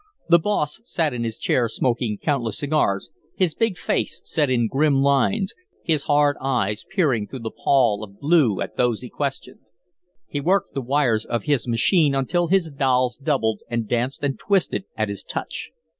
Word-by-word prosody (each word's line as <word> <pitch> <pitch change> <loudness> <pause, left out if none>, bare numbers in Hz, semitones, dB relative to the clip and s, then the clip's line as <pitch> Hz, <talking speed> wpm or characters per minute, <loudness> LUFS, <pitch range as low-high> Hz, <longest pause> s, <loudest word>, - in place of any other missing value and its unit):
The 170 0 +7
boss 165 -1 -1
sat 165 - -1
in 120 -1 -3
his 115 -1 -3
chair 120 -2 +1
smoking 115 -2 -1
countless 120 -7 -1
cigars, 145 -10 0 0.2
his 180 -5 +1
big 225 -2 0
face - - -1
set 150 -4 0
in 120 -2 +2
grim 140 +3 +2
lines, 140 - +2 0.3
his 155 -4 0
hard 145 -1 +3
eyes 115 -6 -1
peering 145 - +1
through 130 - -8
the 110 -1 -4
pall 115 -6 +2
of 100 -1 -11
blue 145 - +3
at - - -5
those 120 -3 +1
he 125 - -8
questioned. 140 -2 -4 0.7
He 145 - -3
worked 185 +5 +1
the 135 - -2
wires 125 -4 +1
of 120 - -3
his 145 -5 0
machine 140 - +3
until 170 +6 +1
his 175 -2 +2
dolls 130 -3 +1
doubled 135 -7 0
and 115 -2 -2
danced 125 +5 -1
and 140 -2 -1
twisted 195 -1 0
at 110 0 0
his 100 - -5
touch. - - -5
135 Hz, 175 wpm, -23 LUFS, 120-155 Hz, 0.7 s, The